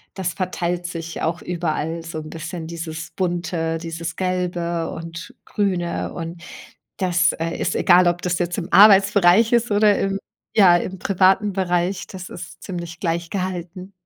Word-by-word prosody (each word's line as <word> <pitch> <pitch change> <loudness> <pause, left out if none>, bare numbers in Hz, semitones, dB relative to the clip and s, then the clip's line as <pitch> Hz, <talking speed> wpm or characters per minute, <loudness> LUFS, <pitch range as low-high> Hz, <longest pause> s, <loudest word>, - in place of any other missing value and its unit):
das 185 -3 -2
verteilt 180 -2 -2
sich 165 -2 -6
auch 170 +2 -1
überall 165 -1 -2
so 165 -1 -6
'n 155 0 -8
bisschen 165 +1 -6
dieses 160 -1 -6
Bunte, 170 -3 -2
dieses 165 0 -5
Gelbe 175 -2 -2
und 165 +1 -8
Grüne. 180 -4 -1
Und 170 0 -6 0.6
das, 180 -2 +2
äh, 165 +1 -3
ist - - -1
egal, 180 0 +5
ob 175 0 +1
das 180 0 -1
jetzt 175 0 -1
im 170 - -7
Arbeitsbereich 200 +1 +6
ist 235 0 +3
oder 205 0 +4
im 195 0 0 0.4
ja, 180 -5 +7
im 185 +2 -5
privaten 195 +2 +3
Bereich, 180 0 0
das 185 -1 -8
ist 170 -2 -10
ziemlich 170 -3 -6
gleich 170 -1 -2
gehalten. 185 0 -4
175 Hz, 155 wpm, -22 LUFS, 165-185 Hz, 0.6 s, ja